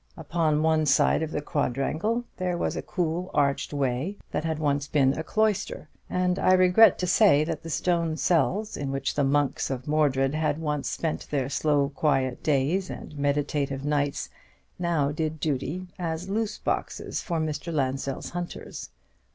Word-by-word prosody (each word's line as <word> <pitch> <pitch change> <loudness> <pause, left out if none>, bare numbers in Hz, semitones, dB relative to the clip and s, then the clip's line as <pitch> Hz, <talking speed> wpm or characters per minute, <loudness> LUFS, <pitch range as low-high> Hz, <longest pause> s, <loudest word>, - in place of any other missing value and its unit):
Upon 160 -1 0
one 160 -1 +2
side 140 +3 +4
of 160 - -2
the 150 -2 -3
quadrangle 155 - -1
there 180 -1 -1
was - - -1
a - - -2
cool 175 +1 -2
arched 140 -1 +1
way 140 +7 -1
that - - -1
had 160 -1 -1
once 145 -2 0
been 135 -3 +3
a 160 - -3
cloister; 215 -5 0 0.2
and 180 0 0
I 185 - +4
regret 185 +4 +6
to 180 - -1
say 180 -5 +5
that 155 -1 -3
the 165 - -8
stone 165 0 0
cells 190 +6 +1
in 140 -1 -3
which 135 0 -1
the 145 - +1
monks 140 0 +1
of 130 0 -4
Mordred 140 -3 +2
had 155 -1 0
once 150 -3 -2
spent 160 -2 -3
their 135 -3 -1
slow 145 -1 +1
quiet 135 -2 0
days 155 +6 +1
and 155 - -8
meditative 140 -1 -1
nights 145 -1 -1 0.5
now 165 -5 +1
did 155 +1 -2
duty 150 +5 -2
as 165 +1 -3
loose 215 0 -1
boxes - - -3
for 170 -4 -2
Mr. 155 +2 -3
Lansdell's 135 -2 -2
hunters. 175 0 -6
155 Hz, 165 wpm, -26 LUFS, 140-170 Hz, 0.5 s, regret